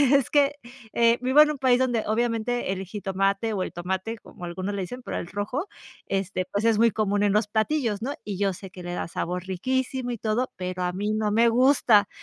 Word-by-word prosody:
es 275 -3 +2
que, 285 -1 +3 0.4
eh, 235 0 +4
vivo 260 +4 +4
en 305 0 +5
un 300 - -5
país 255 -2 +3
donde 245 -4 +1
obviamente 230 -1 0
el 190 0 -4
jitomate, 195 +2 -1
o 190 - -1
el - - -5
tomate 190 +6 -3
como 180 - -14
algunos 185 +4 -4
le 195 - -2
dicen, 250 +8 -6
pero - - -4
el - - -6
rojo, 210 - -3 0.4
este 195 -1 -1
pues 205 +2 -1
es 225 -2 +4
muy 230 0 +5
común 205 -1 0
en 205 - +3
los 210 0 +2
platillos, 220 0 0
¿no?, 260 +5 -2
y 205 -3 -4
yo 200 0 +1
sé 190 +1 -10
que 180 -1 -10
le 175 0 -5
da - - -3
sabor 180 +2 -3
riquísimo 255 +6 -2
y 235 - -3
todo, 220 +4 -1
pero 180 0 -3
a 180 - 0
mí 205 +4 -2
no 215 -1 0
me 230 +2 +4
gusta 235 -4 +4
215 Hz, 225 wpm, -25 LUFS, 195-245 Hz, 0.4 s, en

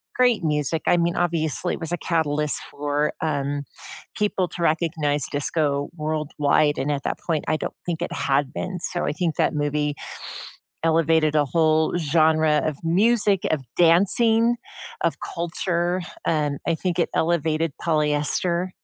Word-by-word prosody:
great 245 -6 +3
music, 150 0 0
I 175 - +5
mean, 170 0 +1
obviously, 170 0 0
it - - -10
was 165 0 -4
a 175 - 0
catalyst 150 -3 0
for, 145 +1 -1
um, 145 -2 -2 0.5
people 200 -3 0
to 170 +2 -5
recognize 155 -3 +1
disco 145 -1 0
worldwide, 150 -1 +1
and 140 +2 -1
at 140 -1 -2
that - - -2
point, 160 -3 -2
I 155 - +1
don't - - -5
think 170 -1 -3
it - - -3
had 140 -2 0
been, 185 -1 -4
so, 175 0 -2
I - - 0
think 165 0 -1
that - - +1
movie 145 0 -1 0.9
elevated 160 -1 +2
a 150 - +4
whole 160 +2 +2
genre 155 -1 +3
of 155 -3 -2
music, 205 +3 +2
of 155 -3 0
dancing, 220 +7 +4 0.5
of - - +1
culture. 175 +1 -1 0.2
Um, 150 -3 0
I 165 - +2
think 180 +1 -2
it 170 - +2
elevated 165 -1 +1
polyester. 155 +3 +1
160 Hz, 150 wpm, -23 LUFS, 150-175 Hz, 0.9 s, I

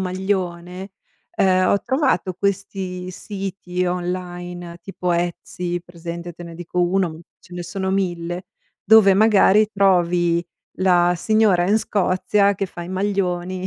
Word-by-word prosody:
maglione, 185 0 -3 0.4
uhm, 185 -1 +3
ho 200 - +2
trovato 265 -8 +1
questi 190 -1 -3
siti 185 -2 -4
online 175 -1 -4
tipo 180 -2 -3
Etsy, 175 0 -3
presente? 170 0 -8
Te 175 - -11
ne 170 -1 -9
dico 175 +1 -3
1, 185 0 +1
m 160 +1 -11 0.2
ce 180 - -19
ne 175 - -4
sono 190 +2 -3
1000, 175 -2 -2 0.4
dove 220 -2 +7
magari 210 0 +5
trovi 175 -3 +2 0.3
la 175 -2 +4
signora 200 -2 +2
in 210 - +4
Scozia 200 0 +1
che 195 - -2
fa 175 - -9
i 170 - -8
maglioni 185 -1 -2
180 Hz, 130 wpm, -21 LUFS, 175-195 Hz, 0.4 s, dove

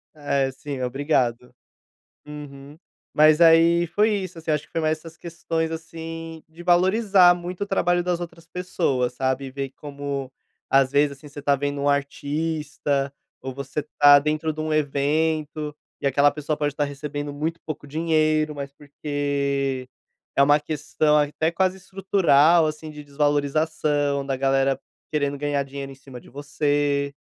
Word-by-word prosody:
É, 140 -2 0
sim. 135 0 -6
Obrigado. 125 -2 -1 0.7
Uhum. 145 0 -10 0.4
Mas 155 +1 +5
aí 170 +1 +6
foi 210 +6 +2
isso, 185 -3 -5
assim, 160 - -8
acho 150 -1 0
que - - -33
foi 165 - -1
mais 155 0 +1
essas 165 0 -13
questões, 165 -1 -3
assim, 165 0 -7
de 170 +2 -12
valorizar 185 +1 +5
muito 175 +2 -7
o - - -6
trabalho 175 -2 +1
das 175 -1 -1
outras 170 -1 -9
pessoas, 140 -9 -1
sabe, 130 +1 -2
ver 135 0 -4
como 140 -2 -5 0.4
às 135 -1 +3
vezes, 145 0 +2
assim, 140 +2 -14
você 145 0 -10
tá 140 0 +2
vendo 145 +1 -3
um 140 - 0
artista, 145 0 -1 0.3
ou 130 0 -6
você 140 +2 -4 0.2
tá 145 0 +9
dentro 155 +2 0
de 155 - -9
um 155 0 -1
evento, 150 +1 0 0.3
e - - +1
aquela 140 +2 +4
pessoa 150 0 -3
pode 145 -1 -1
estar 145 0 0
recebendo 145 +1 -5
muito 160 +3 -3
pouco 155 -2 -6
dinheiro, 155 0 +1
mas 140 -1 -6
porque 140 -2 -2 0.5
é - - +4
uma 145 +2 +5
questão 150 0 0
até 150 +2 +1
quase 185 +2 0
estrutural, 175 -4 +3
assim, 155 0 -4
de 150 -1 -9
desvalorização 145 0 0
da 135 -1 -1
galera 135 0 +1 0.3
querendo 145 -2 -1
ganhar 145 0 -1
dinheiro 140 0 -7
em - - -11
cima 135 -2 -12
de - - -17
você. 145 0 -1
150 Hz, 155 wpm, -23 LUFS, 140-160 Hz, 0.7 s, tá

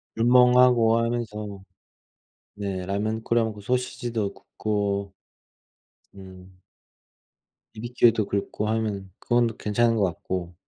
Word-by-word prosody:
불멍 125 +2 +5
하고 120 -3 +5
하면서 105 -4 -3 0.9
네 100 -2 -4
라면 110 +3 -2
끓여 115 -1 +2
먹고 110 -2 -5
소시지도 120 -2 -2
굽고 100 -2 -3 1.0
음 95 -1 -13 1.2
비비큐도 115 -1 +2
긁고 100 +1 -3
하면 105 -3 -2
그건 120 0 +2
괜찮은 115 +2 +1
것 105 - +1
같고. 90 -1 -3
110 Hz, 210 characters per minute, -25 LUFS, 100-120 Hz, 1.2 s, 불멍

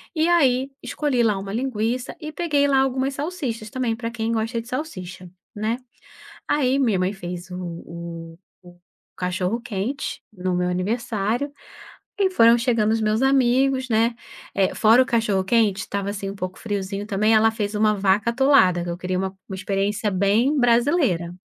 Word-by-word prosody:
E 315 +1 +2
aí 270 -6 +3
escolhi 285 -5 -1
lá 210 -3 +2
uma 195 +1 -6
linguiça 245 0 -2
e 305 0 -5
peguei 295 -4 +1
lá 270 -1 +3
algumas 265 +1 0
salsichas 280 -9 -4
também 240 -1 -1
pra 230 0 -5
quem 230 -1 -2
gosta 230 +1 -1
de 230 - -16
salsicha, 185 - -6 0.3
né. 215 +3 -1 0.7
Aí 270 -2 +2
minha 225 -8 +2
mãe 185 +2 0
fez 180 -1 -7
o 180 - -6 0.3
o 170 -1 -8 0.8
o - - -46
cachorro-quente, 200 +7 -3
no 185 -2 -2
meu 180 0 0
aniversário, 220 +6 -1 0.7
e 385 -1 +3
foram 235 -9 +6
chegando 230 -3 +1
os 225 - +1
meus 215 +1 +1
amigos 265 0 +3
né, 230 +2 +2 0.4
eh, 195 -1 +1
fora 225 +3 +5
o 255 - -3
cachorro-quente 210 -2 +1
estava 200 +1 -3
assim 195 -1 -4
um 195 - -7
pouco 185 -1 -5
friozinho 200 -1 -3
também 215 +2 +2
ela 220 +1 +5
fez 215 -2 -3
uma 215 0 +3
vaca 200 +3 +2
atolada 235 -9 +4
que - - -6
eu 170 - -3
queria 185 0 -2
uma 190 0 -3
uma 190 - -5
experiência 200 +2 -1
bem 210 +10 +2
brasileira. 235 - +2
220 Hz, 165 wpm, -23 LUFS, 195-255 Hz, 0.8 s, foram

